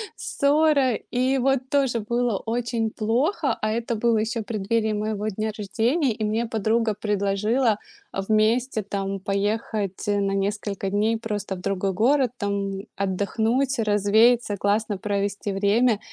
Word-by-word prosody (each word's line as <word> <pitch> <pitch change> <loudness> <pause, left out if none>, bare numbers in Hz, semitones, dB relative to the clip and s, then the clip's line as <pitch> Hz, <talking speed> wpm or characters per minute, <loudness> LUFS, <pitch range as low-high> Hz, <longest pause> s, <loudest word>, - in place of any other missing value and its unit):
ссора. 285 -2 +2 0.2
И 255 +2 +1
вот 265 0 +1
тоже 270 -4 +1
было 235 0 0
очень 230 0 -2
плохо. 240 - 0
А 215 - 0
это 235 +1 -2
было 225 0 +2
ещё 225 +2 -1
в - - -9
преддверии 220 +1 0
моего 210 0 -2
дня 215 +1 -2
рождения. 230 - +1
И 215 - -5
мне 220 +2 0
подруга 225 0 0
предложила, 210 +3 +1 0.4
э, 195 - -2
вместе, 220 +2 +2
там, 195 0 -3
поехать 200 0 -2
на 200 -1 +1
несколько 200 0 -2
дней 215 +3 +1
просто 205 -3 -4
в 180 - -9
другой 195 0 -1
город, 250 +6 +2
там, 200 -1 -2 0.2
отдохнуть, 220 +7 0
развеяться, 215 +2 +3
классно 205 +1 0
провести 200 0 -2
время. 205 +3 +2
215 Hz, 140 wpm, -24 LUFS, 200-235 Hz, 0.4 s, развеяться